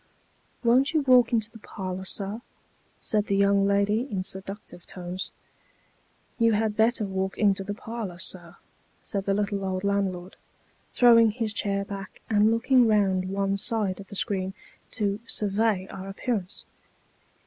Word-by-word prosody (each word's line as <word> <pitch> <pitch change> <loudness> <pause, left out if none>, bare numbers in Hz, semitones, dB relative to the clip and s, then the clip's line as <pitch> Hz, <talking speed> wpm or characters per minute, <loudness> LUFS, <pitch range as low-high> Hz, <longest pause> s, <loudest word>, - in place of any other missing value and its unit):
"Won't 260 +6 +3
yon 305 - +3
walk 250 -2 +6
into 225 -2 0
the 225 - -13
parlour, 190 -3 -6
sir," 200 +3 -2 0.6
said 210 -1 0
the 200 - +1
young 200 0 +4
lady, 205 +5 +2
in 190 -2 -1
seductive 190 -1 -6
tones. 180 +1 -5 0.5
" - - -38
You 230 -1 +4
had 215 0 +1
better 220 0 +2
walk 190 0 -2
into 200 -2 +2
the 205 +1 -4
parlour, 220 -5 -6
sir," 175 -1 -5 0.5
said 195 -1 -3
the 195 - +1
little 200 -1 -1
old 185 0 -2
land 200 -1 +1
lord, 180 +1 -10 0.6
throwing 230 -2 +7
his 220 -1 -2
chair 200 -1 0
back, 195 -1 -8
and 210 0 +5
looking 240 +2 +4
round 190 -3 +2
one 195 0 0
side 205 -2 -1
of 200 - -10
the 200 - -9
screen, 190 -1 -2 0.4
to 205 -3 -1
survey 205 -1 0
our 195 0 -7
appearance. 200 -2 -3
200 Hz, 155 wpm, -26 LUFS, 190-220 Hz, 0.6 s, throwing